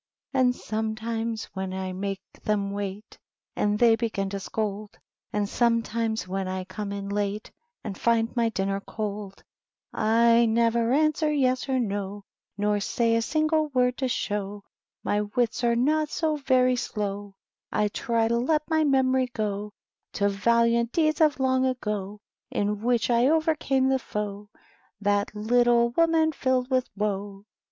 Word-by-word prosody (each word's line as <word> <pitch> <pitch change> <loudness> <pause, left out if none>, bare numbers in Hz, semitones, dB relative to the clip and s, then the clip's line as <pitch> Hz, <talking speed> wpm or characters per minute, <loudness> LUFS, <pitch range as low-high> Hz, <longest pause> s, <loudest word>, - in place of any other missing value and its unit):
And 255 -2 +3
sometimes 220 0 -3
when 190 -1 -4
I 190 -1 -4
make 195 +1 -4 0.2
them 200 -2 0
wait 200 +1 -6 0.4
And 210 0 +1
they 230 0 +5
begin 215 -4 -2
to 200 - -3
scold, 210 +1 -4 0.3
And 210 -1 0
somstim^s 230 -1 0
when 190 +1 -3
I 185 0 -3
corns 200 +2 -5
in 200 0 -5
late, 205 +1 -2 0.3
And 210 -4 -5
find 230 +1 +1
my 235 -1 +2
dinner 195 -2 -1
cold; 205 -2 -6 0.5
I 230 +2 +4
nefver 230 +1 +2
answer 305 +2 +2
yes 260 -2 +1
or 260 -1 +2
no, 200 -2 -3 0.3
Not 205 0 +1
say 230 +2 +1
a 230 - +2
single 310 +4 +1
word 250 -3 +1
to 265 - 0
show 205 -4 -3 0.4
My 205 - +1
wits 230 +3 -1
are 235 -1 +3
not 300 +5 +2
so 320 -4 0
very 255 -3 +3
slow; 205 -3 -4 0.4
I 210 - +2
try 230 +2 0
to 235 +1 +1
let 300 +5 +1
m/y 315 0 +3
memory 260 -2 +2
go 210 -3 -3 0.4
To 200 -1 +1
valiant 235 +3 +2
deeds 310 -1 +2
of 300 -3 +4
long 260 0 +2
ago 210 -5 -2 0.3
In 205 0 -1
which 240 0 +1
I 240 +2 +4
overcame 310 -4 +2
the 265 0 +2
foe. 205 -3 -5 0.5
That 205 0 0
little 235 +2 +3
womun 325 0 +3
filled 260 -1 0
with 255 -1 +1
woe. 200 -1 -3
230 Hz, 150 wpm, -26 LUFS, 205-255 Hz, 0.5 s, they